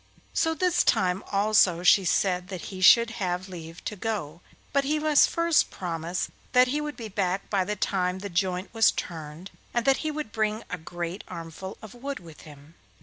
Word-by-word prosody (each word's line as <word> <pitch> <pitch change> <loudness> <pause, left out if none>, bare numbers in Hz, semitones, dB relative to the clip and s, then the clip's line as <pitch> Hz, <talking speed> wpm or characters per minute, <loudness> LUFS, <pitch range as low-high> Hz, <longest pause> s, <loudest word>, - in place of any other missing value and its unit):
So 325 0 +1
this 355 +2 +2
time 185 +1 +2
also 200 -4 +3
she 185 +1 +6
said 180 0 +1
that 185 -2 -6
he 185 - -7
should 235 +5 +7
have 180 0 -1
leave 165 -2 -10
to 210 - -3
go, 180 -7 -4 0.3
but 280 0 +3
he 300 +3 0
must 300 -1 +4
first 335 -1 +2
promise 170 0 -4 0.2
that 250 0 +6
he 295 +3 0
would 300 0 -5
be 230 - -6
back 195 -2 -2
by 195 -2 +2
the 210 - -2
time 185 -2 0
the 200 +2 -6
joint 185 +1 -2
was 225 -2 +5
turned 160 +2 -6 0.2
and 240 - +1
that 270 -1 +4
he 310 - -2
would 305 -6 -5
bring 215 0 -1
a 180 - -3
great 175 +3 -5
armful 165 +4 -8
of 215 - -10
wood 275 +3 -5
with 165 -4 -13
him. 145 +1 -14
190 Hz, 195 wpm, -26 LUFS, 175-235 Hz, 0.3 s, should